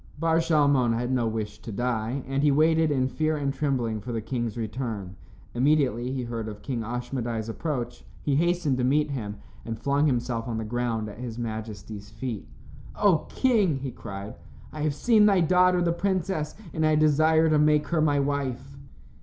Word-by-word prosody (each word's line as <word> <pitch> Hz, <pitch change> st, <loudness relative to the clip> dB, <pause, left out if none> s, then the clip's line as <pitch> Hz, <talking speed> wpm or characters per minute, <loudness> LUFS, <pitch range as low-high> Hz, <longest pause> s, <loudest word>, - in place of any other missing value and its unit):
Bar 165 Hz, +1 st, +2 dB
Shalmon 145 Hz, -7 st, +3 dB
had 120 Hz, +2 st, -2 dB
no 125 Hz, -3 st, +1 dB
wish 110 Hz, -2 st, -4 dB
to 115 Hz, -, -8 dB
die, 120 Hz, +3 st, -2 dB
and 135 Hz, +1 st, -1 dB
he 150 Hz, -, +4 dB
waited, 160 Hz, +2 st, +3 dB
in 130 Hz, -3 st, +1 dB
fear 155 Hz, +3 st, 0 dB
and 140 Hz, -2 st, -1 dB
trembling 125 Hz, -7 st, -1 dB
for 120 Hz, -, -6 dB
the 115 Hz, -, -1 dB
king's 120 Hz, 0 st, -3 dB
return. 110 Hz, -4 st, -4 dB, 0.4 s
Immediately 130 Hz, -2 st, +2 dB
he 130 Hz, -1 st, -2 dB
heard 115 Hz, -2 st, -4 dB
of 105 Hz, -1 st, -8 dB
King 130 Hz, -3 st, -3 dB
Ashmedai's 120 Hz, -1 st, -3 dB
approach, 120 Hz, -1 st, -4 dB, 0.2 s
he 140 Hz, -, +1 dB
hastened 170 Hz, -4 st, +1 dB
to -, -, +1 dB
meet 145 Hz, +3 st, +2 dB
him 105 Hz, -6 st, -4 dB, 0.3 s
and 115 Hz, -1 st, -5 dB
flung 140 Hz, +4 st, +1 dB
himself 120 Hz, -3 st, -1 dB
on 115 Hz, -2 st, -2 dB
the 110 Hz, -, -3 dB
ground 115 Hz, -1 st, -2 dB
at 105 Hz, +1 st, -9 dB
his 120 Hz, -2 st, -6 dB
majesty's 110 Hz, -2 st, -6 dB
feet. 115 Hz, -1 st, -5 dB, 0.5 s
"O 190 Hz, -7 st, +3 dB
King," 210 Hz, -, +2 dB
he 135 Hz, -1 st, -5 dB
cried, 100 Hz, -2 st, -7 dB, 0.4 s
"I 155 Hz, -, -5 dB
have 150 Hz, -2 st, 0 dB
seen 215 Hz, +2 st, +4 dB
thy 200 Hz, -2 st, +4 dB
daughter, 180 Hz, +1 st, +4 dB
the 170 Hz, -, +2 dB
princess, 185 Hz, -4 st, -1 dB, 0.2 s
and 160 Hz, -, -1 dB
I 155 Hz, 0 st, +4 dB
desire 155 Hz, +1 st, +4 dB
to 155 Hz, -, +4 dB
make 150 Hz, 0 st, +3 dB
her 170 Hz, -2 st, +1 dB
my 145 Hz, -2 st, +3 dB
wife." 140 Hz, -1 st, -2 dB
130 Hz, 185 wpm, -26 LUFS, 115-155 Hz, 0.5 s, he